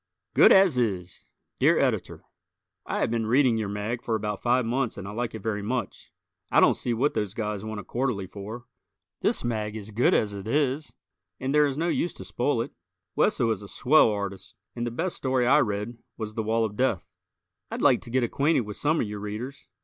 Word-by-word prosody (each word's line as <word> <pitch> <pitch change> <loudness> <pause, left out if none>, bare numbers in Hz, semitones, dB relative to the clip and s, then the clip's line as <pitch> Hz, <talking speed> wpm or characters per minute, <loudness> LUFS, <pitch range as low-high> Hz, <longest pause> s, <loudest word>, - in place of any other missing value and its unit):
"Good - - +7
As 190 -9 +6
Is" 95 -7 -2 0.3
Dear - - +4
Editor: - - -1 0.6
I - - -1
have - - +1
been 115 -2 0
reading 125 -1 +3
your 105 -2 -2
mag 105 +4 -3
for 115 - -1
about 105 -1 -3
five 125 0 +2
months 120 +1 -1
and 100 -1 -6
I - - -5
like 115 +1 -3
it 110 - -8
very 110 -2 -1
much. 120 +4 -4 0.4
I - - +5
don't - - +6
see 120 - -3
what 120 +6 +1
those 105 -2 -2
guys 105 -2 -3
want 110 -1 -5
a - - -14
quarterly 120 -6 -2
for. 105 +5 -8 0.6
This - - +1
mag 110 -3 -2
is 110 0 -7
good 115 +4 +3
as 105 -2 +1
it 100 +1 -7
is 145 +3 0 0.4
and 130 +2 -2
there 150 0 +5
is 135 -1 -3
no 165 +2 0
use 175 0 0
to - - -10
spoil 120 -2 0
it. - - -10 0.4
Wesso 115 -2 +2
is 105 -3 -2
a 100 - -9
swell 135 +4 +4
artist, 100 -2 -5 0.2
and 120 0 -2
the - - 0
best 165 +10 -3
story 130 -2 +1
I 130 - +5
read 105 +1 -2 0.2
was 110 -2 -5
"The 110 - -2
Wall 110 +1 +1
of 105 -1 -5
Death." 105 - 0 0.6
I'd - - -4
like - - +5
to - - -10
get 130 +1 +1
acquainted 140 +5 +2
with 105 -2 -7
some 155 +2 +1
of - - -1
your 105 0 -5
Readers. 110 +7 -6
115 Hz, 220 wpm, -26 LUFS, 105-130 Hz, 0.6 s, Good